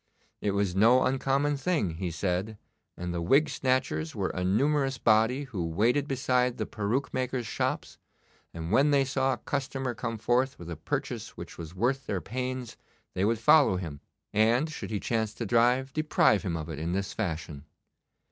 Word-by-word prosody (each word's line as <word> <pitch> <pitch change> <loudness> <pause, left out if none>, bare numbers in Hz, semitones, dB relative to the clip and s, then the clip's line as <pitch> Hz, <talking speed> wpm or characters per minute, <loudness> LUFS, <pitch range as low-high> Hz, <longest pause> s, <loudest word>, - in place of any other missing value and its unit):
It 100 -1 0
was 100 -3 0
no 115 +6 +5
uncommon 135 +2 +1
thing, 150 - 0
he 90 0 -2
said, 95 +5 -2 0.4
and 90 0 -4
the 85 - -2
wig 135 - +4
snatchers 105 - -1
were 95 -2 -1
a 90 - -3
numerous 135 +7 +1
body 115 +5 +3
who 115 -11 -4
waited 115 - +1
beside 125 -2 +1
the 110 - -2
peruke 110 +8 -2
maker's 130 -1 -2
shops, - - -3 0.5
and 85 +1 -6
when 140 +2 +4
they 140 -2 +3
saw 135 0 +1
a - - -4
customer 135 -2 -3
come 115 0 -4
forth 125 +5 +1
with 85 0 -9
a - - -3
purchase 80 - -4
which - - -9
was 85 +1 -8
worth 130 +7 0
their 95 - -1
pains 125 +5 -4 0.4
they 95 - -1
would 115 +3 +2
follow 120 -2 +5
him, 80 -6 -6 0.3
and, 120 +8 +3
should - - -6
he 105 -2 -2
chance 110 -1 -1
to 115 - -4
drive, 125 +4 +2
deprive 155 -9 +3
him 90 -4 -2
of 80 -1 -5
it 80 -3 -6
in 85 +2 -2
this 95 +1 -2
fashion. 80 -4 -4
115 Hz, 180 wpm, -28 LUFS, 95-130 Hz, 0.5 s, no